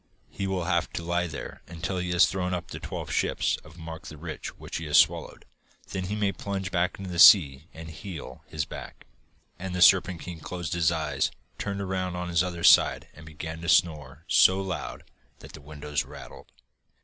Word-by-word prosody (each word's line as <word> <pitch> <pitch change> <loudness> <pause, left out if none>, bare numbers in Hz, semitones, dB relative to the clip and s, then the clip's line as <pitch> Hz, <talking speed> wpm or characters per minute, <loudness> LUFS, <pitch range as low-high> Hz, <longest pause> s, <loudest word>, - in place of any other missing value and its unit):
'He 95 - -3
will 95 -2 -1
have 85 -1 0
to 85 - -4
lie 85 +1 0
there 80 - -8 0.2
till 95 -2 -1
he 90 0 -3
has 90 0 +5
thrown 90 -2 -2
up 90 - -6
the - - -6
twelve - - -6
ships - - 0
of 75 +2 -16
Mark 80 -1 -8
the 75 - -9
Rich 80 0 -7
which - - -6
he 80 -2 -6
swallowed. - - +3 0.5
Then 95 -1 -3
he 100 +3 -3
may 105 -2 +1
plunge 95 -2 -4
back 90 +1 0
into 95 -2 -7
the 85 - -3
sea 75 -7 +7
and 80 0 -10
heal 80 +1 -9
his 75 -1 -3
back.' - - -10 0.5
And 90 0 -5
the 90 - -2
Serpent 90 -2 +5
King 85 -2 -7
closed 85 0 -5
his 85 -1 +2
eyes, 80 -3 -1 0.3
turned 100 -1 -3
round 95 -1 -2
on 90 0 -4
his 85 -1 +2
other 85 -2 -4
side, - - +5
and 80 - -14
began 80 +1 -7
to 85 - -3
snore 75 -3 +1
so 95 +1 +5
loud 95 -3 -5 0.3
that - - -13
the 80 - -11
windows 75 0 -4
rattled. - - -12
85 Hz, 195 wpm, -27 LUFS, 80-95 Hz, 0.5 s, sea